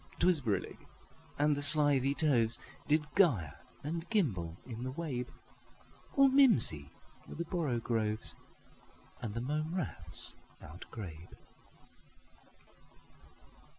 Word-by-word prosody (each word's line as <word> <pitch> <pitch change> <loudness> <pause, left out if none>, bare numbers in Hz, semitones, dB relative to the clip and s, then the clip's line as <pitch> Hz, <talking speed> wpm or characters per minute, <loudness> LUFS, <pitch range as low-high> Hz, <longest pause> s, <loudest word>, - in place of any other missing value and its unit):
'T - - 0
was 180 -5 +3
brillig, 100 -7 -4 0.6
and 150 0 +1
the 145 - -4
slithy 145 -2 +7
tovesDid 145 +2 0
gyre 125 - +1 0.3
and 165 +3 -6
gimble 95 - -2
in 120 -2 -9
the 130 +1 -5
wabe; 130 -5 -6 0.9
All 275 -1 +4
mimsy 225 - +5 0.4
were - - -11
the 170 - -5
borogoves, 115 -10 -3 0.9
And 110 -3 -7
the 115 - -4
mome 155 +6 -4
raths 175 -8 -1 0.2
outgrabe. 85 +1 -12
135 Hz, 100 wpm, -31 LUFS, 110-160 Hz, 0.9 s, slithy